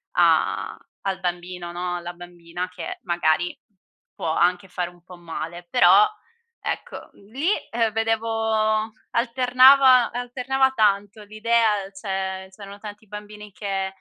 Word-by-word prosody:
a - - +2 0.3
al 190 -1 -1
bambino, 175 -1 -4
no, 175 0 -3
alla 175 0 -7
bambina 175 0 -7
che 180 -2 -7
magari 175 -1 0 0.6
può 160 - -2
anche 180 +3 +1
fare 180 -1 -3
un 175 -1 -21
po' 180 -1 -13
male. 170 +1 -7
Però 410 +11 +6 0.5
ecco, - - -5
l 200 +1 -20
lì, 290 +9 0 0.2
ehm, 230 -1 +1
vedevo 220 -1 0 0.2
alternava 255 +1 +5
alternava 255 +2 0
tanto 205 -1 +1
l'idea 215 -1 +1
cioè, 190 -1 -4
c'erano 200 -1 -11
tanti 210 0 -10
bambini 210 0 -10
che, 195 -1 -3
205 Hz, 125 wpm, -23 LUFS, 180-225 Hz, 0.6 s, Però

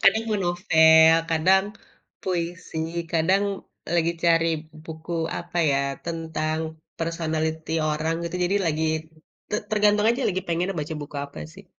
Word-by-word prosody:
Kadang 220 +3 +5
mau 210 - +1
novel, 160 -3 +6 0.2
kadang 185 +4 +4 0.6
puisi, 175 -2 -3 0.3
kadang 185 +5 +3 0.5
lagi 170 0 +2
cari 165 0 +4 0.4
buku 160 +1 -8 0.3
apa 175 0 -5
ya? 135 - +2 0.3
Tentang 160 -1 -2 0.4
personality 160 -1 -2 0.2
orang, 155 +2 -1
gitu. 170 +1 -3
Jadi 195 +3 +1
lagi, 160 0 0 0.7
te 210 - +1
tergantung 210 0 +3
aja 240 +4 +2
lagi 185 -1 -1
pengennya 175 +3 -1
baca 155 +2 -4
buku 145 0 -9
apa 140 - -11 0.2
sih. 195 +1 -13
165 Hz, 130 wpm, -24 LUFS, 160-185 Hz, 0.7 s, novel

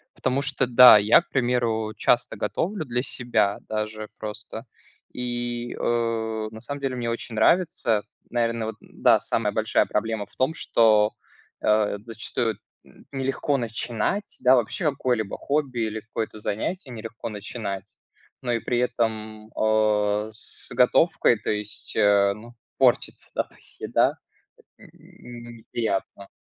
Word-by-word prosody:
Потому 135 +2 0
что 135 -2 0
да, 125 -2 +10
я, 105 +9 +6
к 175 - -26
примеру, 120 -4 0
часто 120 +1 +2
готовлю 185 -3 -2
для 125 0 -1
себя 115 -7 0
даже 110 0 -3
просто. 110 +2 -7 0.5
И, 120 -1 -3
э, 115 -2 -1
на 110 0 -10
самом 140 +3 -6
деле 135 -2 -1
мне 120 -2 -2
очень 115 -1 -4
нравится. 120 - +2 0.3
Наверное, 115 -2 0
вот 110 - -5
да, - - +3
самая - - -1
большая - - +2
проблема 110 0 -2
в - - -27
том, 130 +5 +1
что, 110 -5 +3 0.5
э, 105 -1 +2
зачастую 115 -1 -3 0.3
н - - -19
нелегко 135 +1 0
начинать, 120 - -2
да 130 +1 +7
вообще 125 - -1
какое-либо 125 -7 -1
хобби 140 -4 -1
или 110 0 -5
какое-то 110 -1 -5
занятие 130 - -3
нелегко 115 0 -7
начинать, 105 -1 -5 0.6
но 120 - -2
и 115 - +1
при 120 +1 -1
этом, 110 -3 -2
о, 105 -1 +2
с 110 - -6
готовкой, 125 -2 +4
то - - -4
есть, 105 0 -5
э, 100 -1 +4
ну, 120 +3 -13 0.2
портится, - - +2
да, - - +2
то - - -23
есть - - -20
еда- - - +2 0.5
это - - -24
н - - -15
н 120 -1 -13
ну, 120 - -10
неприятно. 110 -4 -4
115 Hz, 145 wpm, -25 LUFS, 110-125 Hz, 0.6 s, да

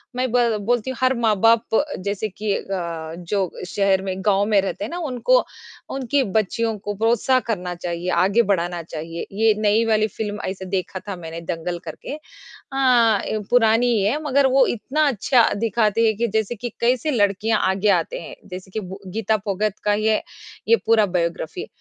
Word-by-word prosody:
मैं 255 +1 0
ब 245 - +3 0.2
बोलती 240 +3 0
हूँ 260 - -5
हर 255 0 +4
माँ-बाप 225 +2 +3 0.2
जैसे 200 +2 -3
कि 205 +1 -2
अ, 170 -4 -4
जो 185 +1 -2 0.2
शहर 195 0 +1
में 190 -1 -3
गाँव 200 -1 +3
में 210 -2 +3
रहते 195 +1 -4
हैं 225 - -6
ना, 345 - -4
उनको 330 - +2 0.5
उनकी 270 +1 +1
बच्चियों 225 +2 0
को 205 +1 -5
प्रोत्साह 235 +4 +2
करना 180 -5 -2
चाहिए, 175 +1 -4
आगे 190 +6 +3
बढ़ाना 175 -1 -1
चाहिए, 165 +1 -6
ये 220 +1 +3
नई 215 +2 +3
वाली 215 -1 +2
फ़िल्म 210 0 -5
ऐसे 190 0 -5
देखा 185 0 -3
था 200 - -3
मैंने 165 -1 -7
दंगल 175 +1 -3
करके। - - -7
अ 250 -7 0
ए, 215 - -2
पुरानी 235 0 +4
ही 210 - +1
है 260 +10 0
मगर 280 -1 +3
वो 265 0 +4
इतना 290 +6 0
अच्छा 245 0 +3 0.2
दिखाते 225 0 +2
हैं 220 -2 +2
कि 235 +1 +1
जैसे 220 +1 -1
कि 240 +2 -5
कैसे 250 +5 +2
लड़कियाँ 210 -1 +1
आगे 195 +2 +1
आते - - -7
हैं, - - -9
जैसे 185 +1 -8
कि 220 - -3
बु 190 -1 -7 0.2
गीता 220 0 +1
फोगाट 205 +1 -1
का 210 - +2
ये 215 +1 +1 0.5
ये 460 - +6
पूरा 225 -2 +4
बायोग्राफ़ी। 175 - -3
215 Hz, 180 wpm, -22 LUFS, 190-235 Hz, 0.5 s, ये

